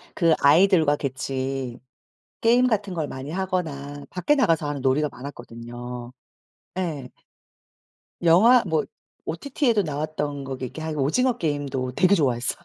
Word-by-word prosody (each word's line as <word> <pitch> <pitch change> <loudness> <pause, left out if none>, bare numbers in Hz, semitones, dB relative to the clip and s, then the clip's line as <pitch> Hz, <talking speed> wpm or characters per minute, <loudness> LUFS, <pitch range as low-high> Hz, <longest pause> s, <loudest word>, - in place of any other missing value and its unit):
그 165 -3 +4
아이들과 160 0 +5
같이 130 -2 -3 0.6
게임 240 +2 +4
같은 205 -5 -1
걸 160 -4 -2
많이 135 +2 -7
하거나 155 -6 -3
밖에 185 +11 +1
나가서 165 - +2
하는 145 -1 -3
놀이가 140 +3 +2
많았거든요. 120 -1 -8 0.7
예. 150 -8 -3 1.1
영화 220 +9 +6
뭐 160 -4 +1 0.4
OTT에도 235 - 0
나왔던 150 -2 -3
거 135 0 -5
이렇게 130 +5 -6
하는 155 -1 -4
오징어 245 - +2
게임도 145 - -2
되게 190 +2 +4
좋아했어요. 125 -7 0
150 Hz, 300 characters per minute, -24 LUFS, 135-185 Hz, 1.1 s, 영화